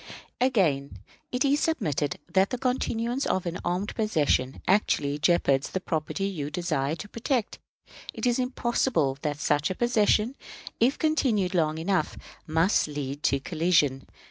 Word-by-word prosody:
Again, 180 - +1 0.3
it 250 +3 +1
is 280 +1 +3
submitted 150 - -1 0.2
that 190 +1 +4
the 250 - -2
continuance 250 0 -1
of 185 - 0
an 175 +1 -3
armed 180 +4 -2
possession 150 - +1
actually 150 -7 +2
jeopards 145 -4 +2
the 190 - -2
property 170 +2 -2
you 160 -8 -3
desire 155 -4 -1
to 205 - -8
protect. 230 +1 -2 0.5
It - - -5
is 245 0 +2
impossible 240 - +1
but 135 - -20
that 145 -1 -2
such 145 0 +1
a 185 - -3
possession, 230 0 +2 0.5
if 250 +5 +3
continued 240 - +1
long 155 -3 +1
enough, 165 -1 -1 0.3
must 165 +5 +2
lead 145 -1 -5
to 140 - +2
collision. 155 -4 +1
180 Hz, 145 wpm, -27 LUFS, 150-235 Hz, 0.5 s, that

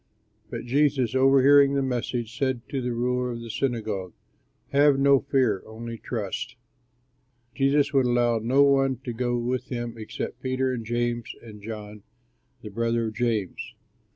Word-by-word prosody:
But - - -6
Jesus, 135 -2 +2
overhearing 135 +1 +5
the 140 - +1
message, 120 -2 -3
said 130 -2 -1
to 135 - -2
the 125 0 -2
ruler 125 +1 -1
of 115 - -7
the 115 -1 -6
synagogue, 110 -8 -2 0.6
"Have 145 0 +4
no 140 0 +5
fear, 130 -8 +1
only 115 +1 -7
trust." 120 +3 -4 1.0
Jesus 140 +2 +2
would 135 -2 +3
allow 120 -1 +2
no 130 +6 +3
one 135 -1 +3
to 120 - -4
go 120 +1 -1
with 125 +1 -2
him 120 -2 -5
except 110 +3 -6
Peter 130 0 0
and 120 -2 -4
James 120 0 -2
and 105 -3 -11
John 105 -1 -8 0.6
the 105 - -6
brother 115 +1 0
of - - -10
James. 110 -6 -2
120 Hz, 155 wpm, -25 LUFS, 115-135 Hz, 1.0 s, overhearing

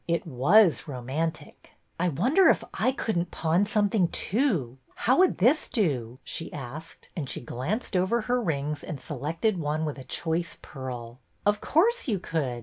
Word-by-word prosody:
It 170 -1 0
was 165 - +4
romantic! 145 +4 -4 0.3
I 180 +1 +2
wonder 250 - +4
if - - +3
I 255 - +2
could 225 -8 -1
n't 175 0 -2
pawn 170 +6 +1
something, 205 -3 +2
too? 175 - 0 0.2
How 255 +7 +2
would 370 -1 +4
this 255 - +3
do? 130 - -1
" - - -44
she 165 - -5
asked, 145 +4 -8
and 145 -7 -4
she - - -2
glanced 160 - -3
over 190 +6 +2
her 245 +2 0
rings 150 -5 -2
and 150 - -6
selected 165 - -2
one 155 0 -1
with 150 -2 -4
a - - -8
choice 165 +5 -2
pearl. 125 -3 -7 0.3
Of 205 0 +2
course 460 +7 +2
you 215 -5 +1
could. 145 -9 -2
165 Hz, 170 wpm, -27 LUFS, 140-215 Hz, 0.3 s, was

